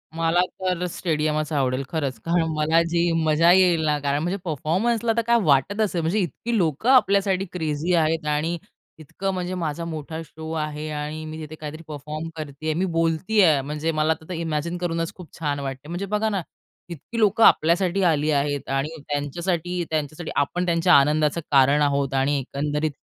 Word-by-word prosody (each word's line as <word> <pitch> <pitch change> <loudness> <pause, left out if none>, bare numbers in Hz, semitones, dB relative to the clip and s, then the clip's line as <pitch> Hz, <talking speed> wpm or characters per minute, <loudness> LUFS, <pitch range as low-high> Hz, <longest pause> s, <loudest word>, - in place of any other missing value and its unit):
मला 165 +1 +2 0.2
तर 180 -1 -1
स्टेडियमचं 155 -2 -1
आवडेल. 130 -1 0
खरंच, 140 -7 -2
कारण 170 0 +2
मला 155 +2 +3
जी 170 0 +1
मजा 160 +2 +4
येईल 180 -3 +4
ना, 150 -1 +2
कारण 145 0 0
म्हणजे 180 +3 -1
परफॉर्मन्सला 205 - 0
तर - - +4
काय 235 0 +5
वाटत 155 +8 +2
असेल, 185 -5 0
म्हणजे 170 +7 0
इतकी 205 - -2
लोकं 170 - 0
आपल्यासाठी 195 -6 +3
क्रेझी 160 0 -1
आहेत. 160 -1 +1
आणि 150 +3 0 0.4
इतकं 190 +6 -4
म्हणजे 180 0 -3
माझा 165 -2 -3
मोठा 160 0 -5
शो 160 +1 -9
आहे 150 0 -4
आणि 150 +1 -4
मी 155 0 -7
तिथे 155 0 -8
काहीतरी 155 +1 -8
परफॉर्म 150 +2 -6
करतेयं, 155 0 -5
आहे. - - 0
मी 190 - +2
बोलतेयं. 165 -1 +2
म्हणजे 150 +2 -2
मला 155 0 +1
आता 160 0 -16
तर - - -23
ते 165 - -4
इमॅजिन 165 +1 -2
करूनच 165 -2 -2
खूप 180 -3 -12
छान 145 -3 -1
वाटते. 135 +1 -6
म्हणजे 175 +3 -3
बघा 210 +2 0
ना, 195 -3 -1 0.5
इतकी 175 +8 -6
लोकं 215 +1 +3
आपल्यासाठी 175 +4 +3
आली 150 +1 0
आहेत 145 0 -1
आणि 135 +2 0 0.2
त्यांच्यासाठी 175 +4 -2
त्यांच्यासाठी 155 +1 -3
आपण 175 +6 0
त्यांच्या 170 +1 +3
आनंदाचं 150 +3 +3
कारण 140 +2 +5
आहोत. 140 -1 +1
आणि 135 +2 +1
एकंदरीत 150 +3 -2
160 Hz, 175 wpm, -23 LUFS, 150-175 Hz, 0.5 s, काय